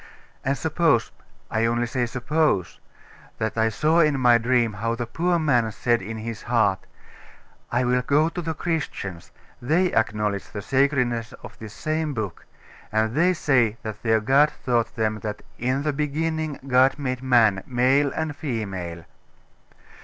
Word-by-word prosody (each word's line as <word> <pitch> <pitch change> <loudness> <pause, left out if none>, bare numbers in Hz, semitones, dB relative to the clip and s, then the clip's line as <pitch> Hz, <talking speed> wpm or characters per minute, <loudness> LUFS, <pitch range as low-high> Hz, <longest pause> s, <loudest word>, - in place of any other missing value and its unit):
And 135 +1 0
suppose 160 -3 +1 0.4
I 110 0 +1
only 120 +1 0
say 120 0 -1
suppose 125 - 0 0.6
that 110 0 -2
I 110 0 +2
saw 155 +8 +2
in 150 -4 +3
my 120 -2 +5
dream 120 -1 +1
how 115 +3 -2
the 120 0 -3
poor 170 +8 0
man 125 -8 +2
said 120 +2 0
in 110 +4 -6
his 110 0 -6
heart, 110 -5 +1 0.8
"I 120 +1 +1
will 125 0 +2
go 145 +5 +2
to 175 - -5
the 160 -1 -3
Christians; 145 - -4 0.3
they 170 +9 +1
acknowledge 105 -2 0
the 105 -2 -7
sacredness 125 -4 +1
of - - -11
this 110 -1 -9
same 155 -2 -2
book; 105 -5 -5 0.4
and 110 +1 +1
they 175 +6 +3
say 120 -9 +2
that 110 -2 -6
their 110 -1 +2
God 140 +7 +4
taught 120 -3 0
them 110 -2 -1
that 105 0 -6 0.2
'in 130 +3 0
the 150 -1 0
beginning 155 +1 -2
God 130 +1 +4
made 130 -3 -3
man, 115 -7 +3
male 130 +3 +2
and 160 -2 -3
female. 95 - -5
125 Hz, 155 wpm, -24 LUFS, 110-145 Hz, 0.8 s, my